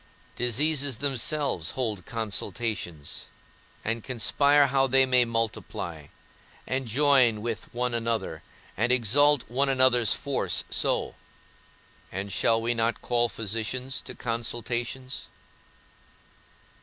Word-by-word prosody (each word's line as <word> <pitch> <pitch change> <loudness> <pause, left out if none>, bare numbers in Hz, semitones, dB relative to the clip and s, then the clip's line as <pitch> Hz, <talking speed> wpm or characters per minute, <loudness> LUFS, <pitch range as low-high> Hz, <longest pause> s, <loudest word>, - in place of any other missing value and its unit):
Diseases 140 +2 +1
themselves 140 - 0
hold 110 -8 -3
consultations, 105 -6 -3 0.6
and 115 +1 -1
conspire 140 +3 +3
how 135 0 +2
they 135 +1 +5
may 125 -1 +4
multiply, 110 -9 -3 0.6
and 130 -1 -2
join 130 -2 +4
with 115 -2 -4
one 125 0 -2
another, 115 -1 -2 0.3
and 115 +4 +1
exalt 130 +4 +4
one 135 +4 0
another's 130 -4 +4
force 100 -11 -1
so; - - 0 1.0
and 95 +2 -4
shall 115 -1 +3
we 115 +1 0
not 115 0 -1
call 120 -1 +1
physicians 115 +5 -3
to - - -8
consultations? 120 +2 -3
120 Hz, 105 wpm, -27 LUFS, 115-130 Hz, 1.0 s, they